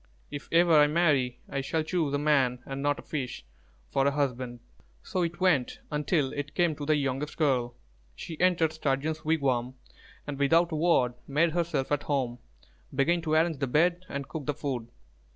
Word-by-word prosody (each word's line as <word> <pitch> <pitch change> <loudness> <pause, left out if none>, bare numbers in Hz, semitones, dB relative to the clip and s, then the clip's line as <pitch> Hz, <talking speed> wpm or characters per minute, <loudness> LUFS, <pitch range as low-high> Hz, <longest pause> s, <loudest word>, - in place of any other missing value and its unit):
If 145 - -7
ever 170 0 +5
I 150 - +6
marry, 145 -7 +1
I 140 - -2
shall 155 +4 -1
choose 160 -3 -1
a - - +2
man, 135 -4 +2
and 135 0 -5
not 145 0 +1
a - - -10
fish, 130 - -5 0.5
for 135 0 +2
a - - +3
husband." 130 -4 -2 0.4
So 185 - -2
it 170 0 -2
went 175 -10 +2
until 150 -1 0
it 145 0 -5
came 175 -3 +2
to 145 - -5
the 155 - +4
youngest 140 +1 -2
girl. 130 -6 +1 0.4
She 160 - -7
entered 170 -3 +3
Sturgeon's 155 0 -1
wigwam 130 -5 0 0.5
and, 145 -1 -5
without 165 +5 +3
a - - -1
word, 150 -7 +3
made 155 +4 +2
herself 165 -5 -1
at 145 -1 +1
home, 130 -5 -1 0.5
began 170 +5 +2
to 155 -1 -2
arrange 160 -2 +2
the 135 - 0
bed 175 +7 +2
and 140 -1 -4
cook 155 -3 -6
the 145 - 0
food. 135 -6 -3
145 Hz, 185 wpm, -28 LUFS, 135-160 Hz, 0.5 s, I